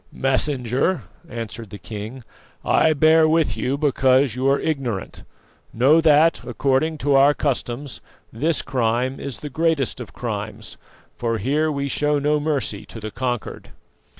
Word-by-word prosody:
"Messenger," 135 +4 0 0.3
answered 115 -1 -6
the 105 - -8
king, 110 +5 -8 0.4
"I 160 - +4
bear 155 +2 +5
with 160 -1 +2
you 130 +2 -1
because 135 -3 +2
you 130 +2 +1
are 140 - +3
ignorant. 130 - -3 0.5
Know 140 +8 +5
that, 160 +1 +4
according 145 +3 0
to 145 - +3
our 140 +2 +5
customs, 135 -1 -3 0.3
this 155 +8 0
crime 125 +1 -1
is 140 -3 -5
the 150 - -5
greatest 160 -4 0
of - - -9
crimes, - - -6 0.4
for 115 -1 -1
here 145 +8 0
we 140 -1 -2
show 150 +2 +1
no 150 +1 +1
mercy 145 -9 -2
to 115 - -9
the 110 0 -6
conquered." 125 -2 -4
135 Hz, 145 wpm, -22 LUFS, 120-150 Hz, 0.5 s, bear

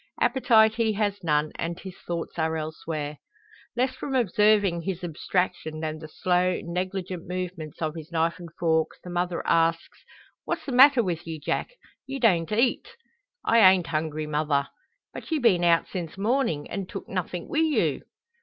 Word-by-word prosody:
Appetite 225 -5 +4
he 225 -1 +1
has 205 -2 -1
none, 150 -1 +1
and 170 +1 -3
his 190 -2 -9
thoughts 170 0 -5
are 160 0 0
elsewhere. 155 -1 -5 0.6
Less 255 +2 +1
from 270 - -4
observing 210 -5 +3
his 185 0 -4
abstraction, 175 -1 -2
than 155 0 -4
the 155 - -9
slow, 180 +2 +1
negligent 180 0 -4
movements 180 -4 -5
of 155 -1 -1
his 160 0 -9
knife 165 +1 0
and 170 -1 -9
fork, 160 -2 +1
the 180 - -8
mother 175 0 -2
asks 165 0 +1 0.4
"What's - - -3
the 275 - -4
matter 260 0 +7
with 170 -4 -3
ye, 160 -1 -4
Jack? 330 - -2 0.3
Ye 270 0 -4
don't 185 -10 +2
eat!" 235 +4 0 0.5
"I 230 - +4
ain't 185 -4 +6
hungry, 155 -1 -2
mother." 150 -2 0 0.4
"But - - -9
ye 320 - +1
been 220 -10 +3
out 170 -1 +4
since 175 -2 -6
mornin', 210 - 0
and 195 -2 -5
tooked - - -7
nothing 180 -2 -4
wi' 310 - -1
you!" 320 -2 +1
175 Hz, 165 wpm, -26 LUFS, 160-210 Hz, 0.6 s, matter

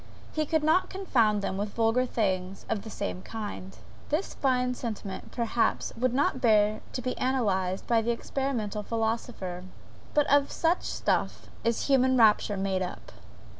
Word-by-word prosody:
He 310 -1 0
could 315 0 +1
not 320 +4 +3
confound 230 - +1
them 190 - -2
with 205 0 -3
vulgar 230 +2 +2
things 190 -4 -1
of 215 - 0
the 220 - -9
same 200 -3 -4
kind. 205 -3 -7 0.3
This 310 +6 -1
fine 250 -2 +1
sentiment, 215 -6 -6
perhaps, 235 -1 0
would 255 +1 +1
not 260 0 +1
bear 215 -2 +4
to 255 - -3
be 255 - -2
analyzed 200 -8 0
by 230 -1 +3
the 225 - -2
experimental 235 -3 -2
philosopher 220 -5 -3 0.5
but 295 -1 +5
of 285 0 +3
such 335 +2 +1
stuff - - -1
is 230 0 0
human 260 -1 +4
rapture 210 -2 +4
made 190 -1 0
up! 180 - -5
230 Hz, 155 wpm, -28 LUFS, 205-260 Hz, 0.5 s, but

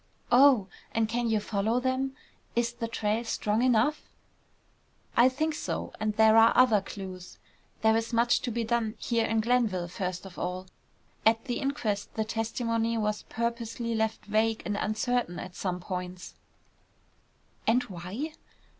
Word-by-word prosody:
"Oh! 255 -4 +6 0.3
And 225 -1 +2
can 235 +1 -1
you 220 -1 +2
follow 215 +3 0
them? 260 +1 -1 0.4
Is 235 0 +1
the 235 -1 -4
trail 225 0 -1
strong 215 -1 0
enough?" 255 +4 +2 1.1
"I 240 +2 +6
think 310 +5 -1
so. - - -4
And 215 -1 -1
there 220 0 +6
are 225 +1 +6
other 235 -5 +6
clues. 185 -2 -8 0.5
There 220 0 +5
is 225 +1 -1
much 235 +1 +3
to - - -2
be 230 +1 -1
done 225 -1 0
here 230 0 0
in 225 0 +1
Glenville 220 -7 +1
first 180 +1 -4
of 190 -2 -10
all. 180 +1 -3 0.6
At 225 +2 +3
the 245 -3 -2
inquest 220 -8 -2
the 220 - 0
testimony 230 +1 -1
was 210 -1 -1
purposely 235 0 -2
left 220 0 -1
vague 220 +2 +1
and 205 - -1
uncertain 215 -2 -1
at 180 -1 -7
some 180 -2 -2
points." 180 0 -6 1.3
"And 245 +3 +4
why?" 195 - -5
225 Hz, 150 wpm, -28 LUFS, 210-240 Hz, 1.3 s, Oh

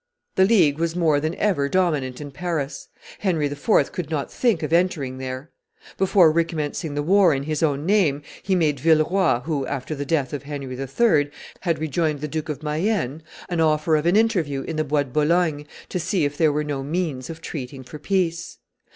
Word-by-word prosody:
The 190 - +4
League 170 -9 +4
was 165 0 -1
more 160 -5 +3
than 155 +4 -2
ever 150 -10 +1
dominant 150 -9 0
in 145 -1 -7
Paris; 150 -3 -4 0.3
Henry 170 -7 0
IV. 145 +9 +1
could 175 -5 -5
not 150 -4 -3
think 225 -10 +1
of 155 +1 -2
entering 155 -7 +1
there. 130 +3 -6 0.4
Before 185 -4 +5
recommencing 160 -2 -2
the 145 - -1
war 185 -1 +4
in 135 - -3
his 155 0 -2
own 145 -2 +1
name, 170 -8 +2 0.2
he 190 - 0
made 150 -6 +1
Villeroi, 160 -1 +3
who, 150 -3 -1
after 135 +1 -4
the 145 -1 -3
death 145 -2 -1
of 145 - -3
Henry 140 -3 -6
III., 145 - +2 0.3
had 170 -3 0
rejoined 155 0 -1
the 150 - -2
Duke 155 +1 -4
of 150 0 -5
Mayenne, 155 - -1 0.3
an 175 -2 -2
offer 155 0 +2
of 155 +2 +1
an 175 - +3
interview 175 -12 +1
in 165 - -5
the 155 - +1
Bois 145 0 +1
de 140 - -13
Boulogne 150 0 +1 0.2
to 180 - -2
see 175 -1 0
if 145 0 -2
there 155 -1 +3
were 150 +1 -1
no 145 -2 -3
means 145 -3 -3
of 165 -1 -7
treating 135 -4 -7
for 150 +4 -10
peace. 170 -3 -1
155 Hz, 195 wpm, -23 LUFS, 145-175 Hz, 0.4 s, Before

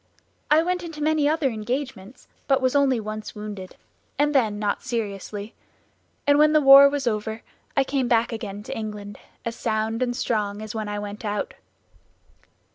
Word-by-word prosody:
I 310 +2 +5
went 360 +1 -1
into 325 -3 -6
many 305 -1 +2
other 305 -4 +1
engagements, 240 0 -5 0.2
but 270 -1 +3
was 255 +1 +1
only 270 -4 +3
once 215 0 -6
wounded, 205 -3 -7 0.4
and 295 +1 +2
then 220 -7 +2
not 205 -1 -1
seriously; 210 -2 -4 0.7
and 285 0 +4
when 305 0 +5
the 305 - +6
war 275 0 +9
was 285 -1 -2
over 220 0 -2 0.3
I 275 - +5
came 270 -2 -1
back 235 -1 +2
again 205 -2 -6
to - - -6
England, 210 -2 -6 0.3
as 230 0 -3
sound 220 +1 -1
and 245 -1 0
strong 210 -5 -1
as 215 - -6
when 215 -2 -4
I 205 - -3
went 205 +2 -6
out." 210 -1 -2
230 Hz, 170 wpm, -24 LUFS, 210-275 Hz, 0.7 s, war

